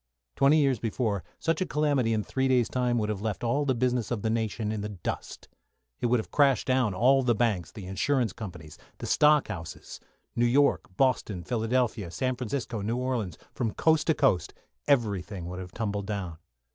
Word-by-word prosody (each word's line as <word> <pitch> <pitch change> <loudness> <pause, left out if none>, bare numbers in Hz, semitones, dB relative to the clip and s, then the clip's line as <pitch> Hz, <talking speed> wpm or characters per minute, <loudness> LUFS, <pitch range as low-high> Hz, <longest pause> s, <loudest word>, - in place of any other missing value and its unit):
Twenty 140 +3 +5
years 135 -6 +2
before, 110 -4 -1
such 165 +2 -1
a - - +2
calamity 145 -6 +1
in 110 -1 +1
three 130 +4 -1
days' 125 -3 +3
time 125 -1 0
would 105 -2 0
have 105 -2 -3
left 110 -1 -3
all 140 +5 +1
the 130 -2 +1
business 125 -2 0
of 115 -4 -3
the 110 - +1
nation 110 -1 -1
in 110 -1 -3
the 105 - -4
dust. 95 -5 -6 0.5
It - - 0
would 120 0 +3
have 110 - -7
crashed 140 -3 +3
down 130 -6 +1
all 130 +6 +4
the 120 -3 +2
banks, 105 -8 0
the 100 - -9
insurance 115 +6 0
companies, 85 -9 -9 0.2
the - - -6
stock 150 -1 +4
houses. 85 -6 -7 0.4
New 120 +1 +3
York, 140 +4 +3
Boston, 115 -8 +1
Philadelphia, 115 -3 0
San 130 +9 -1
Francisco, 120 -2 -3
New 115 +4 -1
Orleans 125 -9 -2 0.2
from 115 -4 -2
coast 160 -1 +2
to 160 - +3
coast, 135 -12 +1 0.3
everything 105 -9 0
would 90 +1 -6
have 90 -1 -8
tumbled 105 -2 -3
down. 95 -6 -4
115 Hz, 190 wpm, -28 LUFS, 105-130 Hz, 0.5 s, Twenty